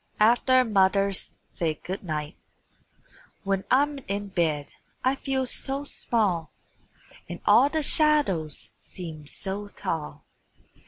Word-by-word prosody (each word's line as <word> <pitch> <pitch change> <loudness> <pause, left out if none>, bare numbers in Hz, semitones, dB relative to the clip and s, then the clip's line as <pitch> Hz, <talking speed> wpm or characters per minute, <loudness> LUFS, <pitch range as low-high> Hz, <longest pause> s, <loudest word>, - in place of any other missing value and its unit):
AFTER 245 +4 +5
MOTHER'S 195 -2 +1 0.2
SAID 160 -3 -2
GOOD 190 +3 -5
NIGHT 155 -2 -4 1.1
When 195 -1 0
I'm 285 +2 +3
in 200 +1 -3
bed 160 -6 0 0.3
I 260 - +3
feel 270 -1 -1
so 270 +2 -2
small, 205 - 0 0.8
And - - -6
all 280 - +6
the 315 0 -1
shadows 285 - +2
seem 160 -5 -7
so 200 +6 -5
tall. 150 -6 -5
195 Hz, 110 wpm, -26 LUFS, 165-260 Hz, 1.1 s, all